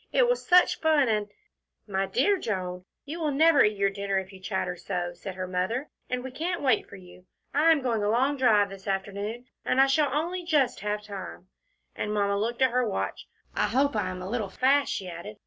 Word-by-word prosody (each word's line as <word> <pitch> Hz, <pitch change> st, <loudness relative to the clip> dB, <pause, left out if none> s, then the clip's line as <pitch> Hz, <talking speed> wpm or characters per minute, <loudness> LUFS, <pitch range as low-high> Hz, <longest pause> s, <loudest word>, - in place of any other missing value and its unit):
It -, -, +4 dB
was -, -, +1 dB
such 360 Hz, 0 st, +5 dB
fun, 310 Hz, -4 st, +3 dB
and 210 Hz, -1 st, 0 dB, 0.3 s
" -, -, -53 dB
"My 195 Hz, 0 st, +1 dB
dear 400 Hz, -, +2 dB
Joan, 180 Hz, -, -4 dB, 0.2 s
you 310 Hz, +4 st, -6 dB
will 310 Hz, -2 st, 0 dB
never 300 Hz, +1 st, +5 dB
eat 210 Hz, -1 st, +1 dB
your 200 Hz, 0 st, +2 dB
dinner 200 Hz, 0 st, -2 dB
if 190 Hz, +1 st, -4 dB
you 190 Hz, -, -12 dB
chatter 190 Hz, -2 st, -2 dB
so," 175 Hz, -1 st, -4 dB
said 185 Hz, +2 st, -8 dB
her 185 Hz, 0 st, -4 dB
mother, 185 Hz, +10 st, -2 dB, 0.2 s
"and 250 Hz, 0 st, -2 dB
we 260 Hz, -, -6 dB
can't 340 Hz, +4 st, -3 dB
wait 255 Hz, -6 st, +2 dB
for -, -, -10 dB
you. 180 Hz, -1 st, -15 dB, 0.3 s
I 300 Hz, +4 st, +4 dB
am 295 Hz, -4 st, +2 dB
going 230 Hz, -4 st, 0 dB
a 205 Hz, -, +1 dB
long 260 Hz, +6 st, +2 dB
drive 215 Hz, -7 st, +3 dB
this 195 Hz, 0 st, -11 dB
afternoon, 200 Hz, +4 st, -3 dB, 0.2 s
and 255 Hz, -, +1 dB
I 270 Hz, -, +8 dB
shall 285 Hz, +1 st, +2 dB
only 345 Hz, +5 st, -2 dB
just 295 Hz, -7 st, +1 dB
have 210 Hz, 0 st, -3 dB
time," 195 Hz, -2 st, -8 dB, 0.5 s
and 210 Hz, -, -3 dB
Mamma 200 Hz, -1 st, +1 dB
looked 235 Hz, +4 st, 0 dB
at 260 Hz, -, +4 dB
her 250 Hz, -2 st, +1 dB
watch. -, -, -3 dB, 0.3 s
"I -, -, +2 dB
hope 280 Hz, +1 st, +1 dB
I 215 Hz, -, 0 dB
am 185 Hz, 0 st, -6 dB
a -, -, -5 dB
little 225 Hz, -5 st, -2 dB
fast," 270 Hz, +7 st, +2 dB
she 190 Hz, -, -3 dB
added. 170 Hz, -11 st, -8 dB
215 Hz, 225 wpm, -27 LUFS, 195-275 Hz, 0.5 s, I